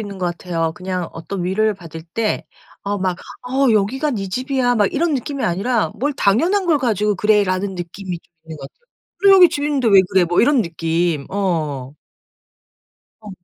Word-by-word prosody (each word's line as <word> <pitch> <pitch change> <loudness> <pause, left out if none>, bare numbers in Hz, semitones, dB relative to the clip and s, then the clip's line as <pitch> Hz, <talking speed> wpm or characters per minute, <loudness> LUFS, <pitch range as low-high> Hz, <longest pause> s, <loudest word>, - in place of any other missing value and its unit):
있는 200 -2 -7
것 180 - -1
같아요. 170 -2 -2
그냥 180 -1 -4
어떤 175 +2 -5
위로를 215 +3 +1
받을 165 -3 -10
때 210 +6 -2 0.4
어 205 +1 -1
막 185 -2 -1 0.3
'어 260 +1 +1
여기가 255 +8 +1
네 195 -4 -3
집이야.' 255 +3 0
막 205 -3 +2
이런 325 +1 +1
느낌이 275 +1 -3
아니라 210 +7 0
'뭘 290 +4 0
당연한 335 - +2
걸 325 -4 +2
가지고 210 -5 0
그래.'라는 200 -2 +1
느낌이 180 0 -6
좀 175 - -36
있는 160 -1 -9
것 140 - -12
같아요. 480 - -42 0.3
'그래 395 +1 +6
여기 365 -3 +8
집인데 285 -5 0
왜 200 -2 +7
그래.' 190 -2 +4
뭐 175 +1 +2
이런 260 -1 +4
느낌 165 -2 -1
어. 155 -9 -2 1.3
어. 210 -2 -10
200 Hz, 330 characters per minute, -19 LUFS, 175-255 Hz, 1.3 s, 여기